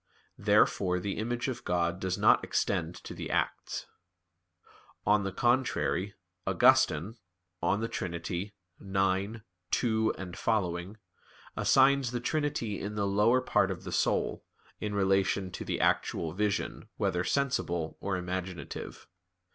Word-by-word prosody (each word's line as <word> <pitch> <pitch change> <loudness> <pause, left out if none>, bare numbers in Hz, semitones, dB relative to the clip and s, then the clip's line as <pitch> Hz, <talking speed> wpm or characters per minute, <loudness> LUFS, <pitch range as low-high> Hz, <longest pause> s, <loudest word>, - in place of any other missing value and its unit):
Therefore 90 -2 +3
the 100 +3 -3
image 120 +3 -2
of 130 - -4
God 85 0 0
does 95 -1 -1
not - - +5
extend - - -1
to - - -7
the - - -6
acts. - - -1 1.2
On 105 0 +4
the 100 - -2
contrary, 120 -4 +1 0.3
Augustine 90 +10 +4 0.4
(De 110 +3 +1
Trin. 85 -6 -4
xi, 95 +5 -3 0.3
2 95 +2 0
seqq.) 90 0 -2 0.6
assigns 135 -1 +4
the 120 0 -2
trinity 120 -5 -1
in 105 +1 -4
the 100 -1 0
lower 105 +6 +3
part 130 - +2
of - - -5
the - - -6
soul, - - 0 0.4
in 105 -1 -3
relation 95 -1 +2
to - - -5
the - - -2
actual 80 -2 +1
vision, 105 +1 -2
whether 90 +1 0
sensible 85 - -1
or 95 -1 -1
imaginative. 90 0 -5
100 Hz, 125 wpm, -30 LUFS, 90-115 Hz, 1.2 s, not